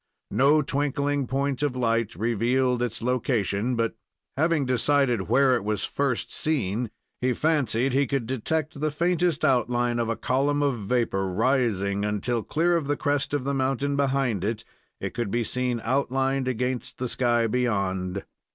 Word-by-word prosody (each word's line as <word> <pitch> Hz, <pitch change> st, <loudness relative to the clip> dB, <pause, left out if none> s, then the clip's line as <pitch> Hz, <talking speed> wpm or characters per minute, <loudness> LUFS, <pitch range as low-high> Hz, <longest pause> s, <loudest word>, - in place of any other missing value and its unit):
No 140 Hz, +7 st, +4 dB
twinkling 140 Hz, 0 st, -1 dB
point 135 Hz, +2 st, -1 dB
of 145 Hz, -3 st, 0 dB
light 115 Hz, -4 st, 0 dB
revealed 120 Hz, +4 st, +1 dB
its 115 Hz, -1 st, -2 dB
location, 120 Hz, -2 st, 0 dB
but, 115 Hz, -1 st, 0 dB, 0.4 s
having 155 Hz, -1 st, +2 dB
decided 125 Hz, -4 st, +1 dB
where 130 Hz, +2 st, +4 dB
it -, -, -2 dB
was 105 Hz, -1 st, -1 dB
first 140 Hz, -4 st, -1 dB
seen, 120 Hz, -7 st, -1 dB, 0.3 s
he 125 Hz, 0 st, +2 dB
fancied 135 Hz, -4 st, +1 dB
he 140 Hz, +1 st, +2 dB
could 135 Hz, -4 st, -1 dB
detect 140 Hz, +5 st, -2 dB
the 155 Hz, +1 st, +1 dB
faintest 170 Hz, 0 st, +1 dB
outline 120 Hz, -2 st, +1 dB
of 115 Hz, -1 st, 0 dB
a 115 Hz, -, 0 dB
column 140 Hz, +5 st, +1 dB
of 135 Hz, -5 st, 0 dB
vapor 100 Hz, -3 st, 0 dB
rising 100 Hz, -2 st, +1 dB
until, 105 Hz, +3 st, -1 dB
clear 170 Hz, +9 st, +1 dB
of 155 Hz, -4 st, -3 dB
the 145 Hz, -, 0 dB
crest 145 Hz, -2 st, 0 dB
of 145 Hz, -2 st, -1 dB
the 140 Hz, +1 st, -1 dB
mountain 135 Hz, +1 st, 0 dB
behind 135 Hz, -7 st, +1 dB
it, 110 Hz, +1 st, -2 dB, 0.4 s
it -, -, -4 dB
could 120 Hz, -4 st, -2 dB
be 120 Hz, +3 st, 0 dB
seen 125 Hz, +1 st, -1 dB
outlined 135 Hz, +1 st, 0 dB
against 125 Hz, 0 st, -2 dB
the 125 Hz, -, -2 dB
sky 120 Hz, -1 st, +1 dB
beyond. 100 Hz, -6 st, -1 dB
125 Hz, 160 wpm, -26 LUFS, 115-140 Hz, 0.4 s, No